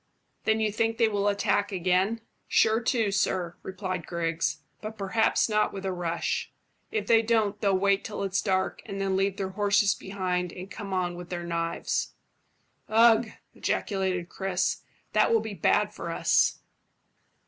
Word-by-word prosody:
"Then 220 0 +2
you 215 -1 +1
think 225 +1 0
they 230 - +4
will 205 -1 0
attack 205 0 +1
again?" 185 +4 +1 0.3
"Sure 220 +1 +3
to, 225 -3 +1
sir," 185 -3 0
replied 185 -3 -5
Griggs; 165 -3 -1 0.2
"but 220 +1 -7
perhaps 200 +3 +2
not 215 -1 +1
with 195 -1 -6
a 190 - 0
rush. 170 -1 -2 0.4
If 435 - -1
they 225 -1 +5
don't, 220 -3 +1
they'll 200 -3 +3
wait 200 +1 +2
till 210 - -4
it's 195 0 0
dark, 190 -2 0
and 195 - -5
then 195 -1 0
leave 195 0 +1
their 195 -2 -2
horses 205 0 +3
behind 180 -2 -2
and 185 +2 -9
come 205 -3 -7
on 180 -2 0
with 175 0 -9
their 175 -1 -4
knives." 170 -1 -2 0.8
"Ugh!" 225 0 +5 0.2
ejaculated 190 -3 -1
Chris. 190 0 -1 0.3
"That 215 +1 +4
will 230 - +5
be 220 -1 -5
bad 185 - +2
for - - -6
us." - - +2
195 Hz, 160 wpm, -27 LUFS, 185-215 Hz, 0.8 s, they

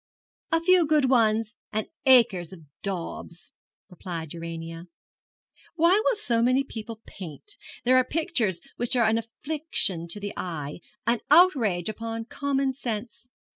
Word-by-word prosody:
'A 330 - +4
few 365 0 +5
good 295 -4 +3
ones 225 -2 +3 0.2
and 215 0 -1 0.2
acres 225 -10 +5
of 185 -3 -11 0.2
daubs,' 175 0 -5 0.4
replied 170 -4 -7
Urania. 165 0 -7 0.9
'Why 345 +5 +4
will - - +2
so 240 - +1
many 255 +3 +3
people 225 -3 -8
paint? 190 - -10 0.3
There 255 +1 +5
are 255 - +5
pictures 235 - 0 0.2
which 245 +2 +2
are 240 -2 +4
an 220 +1 +3
affliction 230 - -2
to 170 +5 -2
the 205 0 -5
eye 150 -4 -5 0.3
an 235 0 +2
outrage 270 - +4
upon 225 +1 -4
common 275 +1 -1
sense. 235 -1 -5
225 Hz, 135 wpm, -26 LUFS, 180-270 Hz, 0.9 s, few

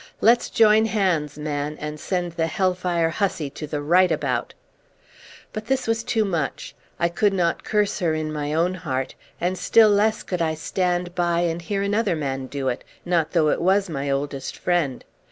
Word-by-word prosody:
Let's 235 +2 +4
join 220 0 +5
hands, 175 -9 0
man, 150 0 -3
and 150 0 -5
send 180 +1 -2
the 165 -1 -1
hellfire 180 -2 0
hussy 165 -7 -1
to 150 +2 -7
the 145 0 -3
right 180 +4 +4
about!" - - -1 1.0
But 215 +1 -6
this 265 -1 0
was 225 0 0
too 225 -3 +1
much. 165 -8 -3 0.3
I 170 - +3
could 195 +4 +1
not 175 -3 0
curse 210 -1 0
her 165 -4 +1
in 155 -1 -3
my 150 -1 -3
own 170 +4 +1
heart, 135 -8 -3 0.3
and 180 +2 -1
still 225 -2 +5
less 210 +2 +2
could 180 -2 -3
I 160 -1 +1
stand 175 +2 -1
by 175 -1 +1
and 170 0 -1
hear 195 +3 -2
another 205 -2 +1
man 135 -3 -3
do 135 0 -4
it; 125 -1 -2 0.2
not 170 -3 0
though 160 -4 +3
it - - 0
was 190 +1 +2
my 140 -1 -3
oldest 140 0 -3
friend. 170 -8 -1
175 Hz, 185 wpm, -23 LUFS, 150-195 Hz, 1.0 s, join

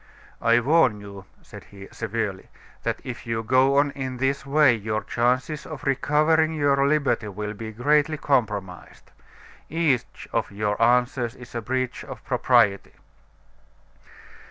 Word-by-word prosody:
"I 115 +1 +4
warn 130 -5 +3
you," 100 -1 -11 0.2
said - - -12
he, 100 -1 -12
severely, 110 -4 -4 0.3
"that - - -2
if 125 -1 -8
you 115 -1 -2
go 130 +4 +3
on 145 0 +3
in 130 -2 -5
this 135 +2 -1
way 145 -2 +5
your 110 -1 -3
chances 125 +5 -1
of 150 -3 -9
recovering 155 +3 +2
your 140 -2 +2
liberty 140 -7 +1
will 105 +1 -5
be 110 +1 -7
greatly 150 +6 +1
compromised. 105 -10 -2 0.6
Each 150 -7 -1
of - - 0
your 105 +1 -2
answers 125 +1 +2
is 125 -1 -13
a 115 - -3
breach 130 +2 -3
of - - -10
propriety." 115 -6 +2
125 Hz, 135 wpm, -24 LUFS, 110-140 Hz, 0.6 s, way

